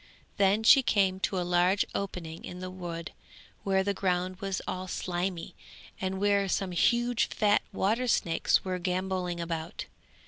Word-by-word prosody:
Then 200 Hz, +2 st, +3 dB
she 270 Hz, +4 st, +8 dB
came 195 Hz, -6 st, +2 dB
to 190 Hz, -1 st, -1 dB
a 175 Hz, -, -1 dB
large 180 Hz, +3 st, +3 dB
opening 175 Hz, -4 st, -5 dB
in 180 Hz, -, -7 dB
the 185 Hz, 0 st, -6 dB
wood 170 Hz, -3 st, -6 dB, 0.5 s
where 190 Hz, -1 st, +2 dB
the 200 Hz, +1 st, 0 dB
ground 185 Hz, -1 st, -1 dB
was 195 Hz, -1 st, -2 dB
all 185 Hz, 0 st, -4 dB
slimy, 180 Hz, 0 st, -3 dB, 0.5 s
and 190 Hz, 0 st, -2 dB
where 200 Hz, -1 st, +2 dB
some 190 Hz, 0 st, -1 dB
huge 240 Hz, +6 st, +2 dB
fat 210 Hz, 0 st, +2 dB
water 220 Hz, +6 st, 0 dB
snakes 170 Hz, -7 st, +2 dB
were 185 Hz, -1 st, -2 dB
gambolling 180 Hz, -1 st, -2 dB
about. 165 Hz, 0 st, -4 dB
185 Hz, 150 wpm, -29 LUFS, 180-200 Hz, 0.5 s, she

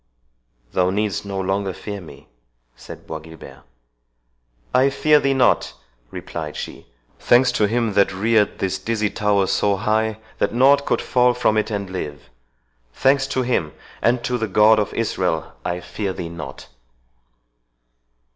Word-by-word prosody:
"Thou 90 Hz, -1 st, +2 dB
needst 105 Hz, +1 st, -1 dB
no 100 Hz, -1 st, -4 dB
longer 95 Hz, 0 st, -1 dB
fear 100 Hz, +1 st, -7 dB
me," 85 Hz, -, -14 dB, 0.5 s
said -, -, -12 dB
Bois 80 Hz, -, -6 dB
Guilbert. 80 Hz, +1 st, -13 dB, 1.1 s
"I 130 Hz, +2 st, +4 dB
fear 150 Hz, +2 st, +3 dB
thee 135 Hz, -1 st, +1 dB
not," 130 Hz, -2 st, +2 dB, 0.4 s
replied 75 Hz, +2 st, -6 dB
she; -, -, -7 dB, 0.3 s
"thanks 125 Hz, +1 st, +4 dB
to 105 Hz, -3 st, +2 dB
him 115 Hz, -1 st, 0 dB
that 100 Hz, 0 st, +3 dB
reared 105 Hz, +2 st, +1 dB
this 95 Hz, -1 st, -2 dB
dizzy 110 Hz, -3 st, -1 dB
tower 100 Hz, -2 st, +1 dB
so 100 Hz, +1 st, +1 dB
high, 110 Hz, +2 st, 0 dB, 0.2 s
that -, -, 0 dB
nought 140 Hz, +3 st, +4 dB
could -, -, 0 dB
fall 125 Hz, -1 st, +3 dB
from 120 Hz, -3 st, +2 dB
it 110 Hz, +1 st, 0 dB
and 100 Hz, -2 st, -3 dB
live—thanks -, -, -3 dB
to 130 Hz, -1 st, -1 dB
him, 100 Hz, -11 st, -1 dB, 0.3 s
and 120 Hz, +1 st, +2 dB
to 125 Hz, 0 st, -1 dB
the 110 Hz, -, -1 dB
God 105 Hz, +3 st, +5 dB
of 105 Hz, -, -1 dB
Israel!—I 90 Hz, -4 st, -2 dB
fear 95 Hz, +3 st, -4 dB
thee 85 Hz, -, -6 dB
not." 70 Hz, -6 st, -9 dB
105 Hz, 145 wpm, -21 LUFS, 90-120 Hz, 1.1 s, God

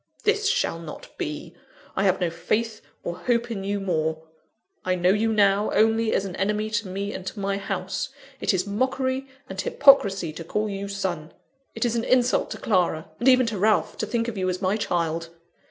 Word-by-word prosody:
This 425 Hz, -1 st, +2 dB
shall 165 Hz, -, 0 dB
not 165 Hz, -2 st, -10 dB
be. 150 Hz, +3 st, -4 dB, 0.4 s
I 195 Hz, -, +1 dB
have 190 Hz, -1 st, +3 dB
no 175 Hz, -3 st, 0 dB
faith 215 Hz, +6 st, -1 dB, 0.2 s
or 175 Hz, +1 st, -4 dB
hope 235 Hz, +3 st, 0 dB
in 195 Hz, -4 st, -3 dB
you 200 Hz, +1 st, -1 dB
more. 160 Hz, -4 st, -1 dB, 0.6 s
I 185 Hz, -, +1 dB
know 180 Hz, +1 st, +3 dB
you 220 Hz, +3 st, +2 dB
now, 205 Hz, -1 st, +3 dB
only 225 Hz, +1 st, +3 dB
as 195 Hz, -, +1 dB
an 185 Hz, -2 st, -5 dB
enemy 210 Hz, +2 st, 0 dB
to 210 Hz, -1 st, -1 dB
me 200 Hz, +2 st, -3 dB
and 190 Hz, -, -6 dB
to 205 Hz, -, -5 dB
my 200 Hz, 0 st, -1 dB
house 195 Hz, -, -3 dB, 0.3 s
it -, -, +2 dB
is 185 Hz, -1 st, 0 dB
mockery 260 Hz, +5 st, -1 dB, 0.2 s
and 190 Hz, 0 st, -4 dB
hypocrisy 200 Hz, -, +4 dB
to 165 Hz, -, -7 dB
call 210 Hz, +6 st, -1 dB
you 200 Hz, -1 st, -4 dB
son; 180 Hz, -5 st, -3 dB, 0.4 s
it -, -, 0 dB
is 240 Hz, -1 st, +1 dB
an 230 Hz, -, 0 dB
insult 250 Hz, 0 st, +3 dB
to -, -, -5 dB
Clara, 175 Hz, -6 st, 0 dB
and 240 Hz, -, 0 dB
even 255 Hz, -1 st, +6 dB
to 220 Hz, -4 st, -2 dB
Ralph, 215 Hz, +2 st, +2 dB
to -, -, -1 dB
think 230 Hz, -1 st, -1 dB
of 220 Hz, -4 st, -4 dB
you 185 Hz, 0 st, +1 dB
as 180 Hz, 0 st, -2 dB
my 190 Hz, +1 st, +1 dB
child. 165 Hz, -5 st, -1 dB
200 Hz, 205 wpm, -25 LUFS, 180-225 Hz, 0.6 s, even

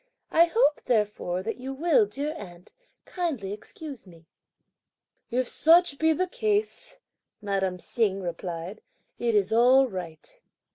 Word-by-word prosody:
I 335 Hz, +1 st, +6 dB
hope 340 Hz, -4 st, +2 dB
therefore 210 Hz, -5 st, 0 dB
that 225 Hz, +3 st, -4 dB
you 265 Hz, +2 st, -6 dB
will, 350 Hz, -, +3 dB
dear 295 Hz, -1 st, -4 dB
aunt, 175 Hz, -3 st, -11 dB, 0.3 s
kindly 280 Hz, -, -3 dB
excuse 265 Hz, +2 st, -10 dB
me." 165 Hz, -2 st, -17 dB, 1.0 s
"If 255 Hz, 0 st, 0 dB
such 330 Hz, -2 st, +4 dB
be 320 Hz, 0 st, +3 dB
the 360 Hz, +4 st, +1 dB
case," 420 Hz, +3 st, -2 dB, 0.4 s
madame 195 Hz, -3 st, -1 dB
Hsing 200 Hz, 0 st, -1 dB
replied, 175 Hz, +2 st, -6 dB, 0.4 s
"it's 215 Hz, -4 st, +1 dB
all 255 Hz, +4 st, +5 dB
right." 185 Hz, -, -9 dB
235 Hz, 125 wpm, -26 LUFS, 190-320 Hz, 1.0 s, I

